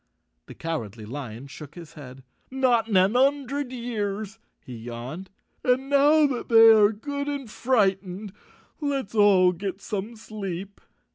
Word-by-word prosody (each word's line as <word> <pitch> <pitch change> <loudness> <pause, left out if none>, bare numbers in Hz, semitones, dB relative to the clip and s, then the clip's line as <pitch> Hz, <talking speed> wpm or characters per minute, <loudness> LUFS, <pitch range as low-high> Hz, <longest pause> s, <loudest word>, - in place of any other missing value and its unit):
The - - -11
Cowardly 115 -10 -5
Lion 125 0 -7
shook 140 +1 -11
his 170 -3 -11
head. 130 -3 -12 0.2
" - - -40
Not 255 -4 +2
in 210 -4 +2
an 190 +5 +3
'un 275 +2 +3
dred 275 0 -4
years," 220 -3 -4 0.3
he 125 - -8
yawned. 120 +10 -7 0.3
"And 260 +2 +1
now 295 +2 +5
that 265 -4 -3
they 225 -1 +8
are 210 -1 +5
good 280 +6 -5
and 285 -3 -4
frightened 195 -4 0 0.5
let's 275 -8 -2
all 200 -4 +5
get 190 +2 -5
some 210 +2 -5
sleep." 200 -3 -7
205 Hz, 150 wpm, -25 LUFS, 175-250 Hz, 0.5 s, they